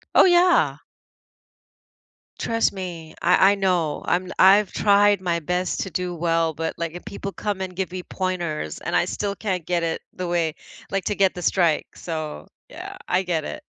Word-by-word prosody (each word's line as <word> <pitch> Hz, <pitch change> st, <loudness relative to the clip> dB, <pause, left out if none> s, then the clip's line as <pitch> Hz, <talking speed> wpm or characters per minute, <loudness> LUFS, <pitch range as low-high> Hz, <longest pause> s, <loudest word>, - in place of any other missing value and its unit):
Oh -, -, +8 dB
yeah. 355 Hz, 0 st, +4 dB, 1.6 s
Trust 230 Hz, 0 st, +1 dB
me, 175 Hz, -5 st, -7 dB
I 185 Hz, +2 st, +5 dB
I -, -, +2 dB
know, 180 Hz, -6 st, 0 dB
I'm 180 Hz, +1 st, 0 dB
I've 195 Hz, +1 st, +6 dB
tried 205 Hz, -1 st, +4 dB
my 170 Hz, -2 st, -1 dB
best 180 Hz, +3 st, -1 dB
to 190 Hz, -, -3 dB
do 180 Hz, 0 st, -2 dB
well, 165 Hz, -1 st, +1 dB
but, 160 Hz, +1 st, -3 dB
like, 165 Hz, -1 st, -3 dB
if 175 Hz, -, -8 dB
people 200 Hz, 0 st, -6 dB
come 205 Hz, -2 st, -3 dB
and 185 Hz, -1 st, -5 dB
give 190 Hz, 0 st, -3 dB
me 185 Hz, 0 st, -4 dB
pointers, 175 Hz, -, -3 dB
and -, -, -3 dB
I -, -, +4 dB
still 200 Hz, -1 st, -3 dB
can't 185 Hz, -6 st, -3 dB
get 175 Hz, -1 st, 0 dB
it 165 Hz, -1 st, -2 dB
the 185 Hz, -, -4 dB
way 170 Hz, -2 st, 0 dB, 0.3 s
like, 195 Hz, -1 st, -1 dB
to 210 Hz, -, 0 dB
get 195 Hz, -1 st, +3 dB
the 180 Hz, -, -6 dB
strike, 170 Hz, -2 st, +2 dB
so 155 Hz, -, -5 dB, 0.2 s
yeah, -, -, -8 dB
I 185 Hz, +1 st, +2 dB
get 170 Hz, -4 st, -1 dB
it. 305 Hz, -, -6 dB
180 Hz, 185 wpm, -23 LUFS, 165-195 Hz, 1.6 s, Oh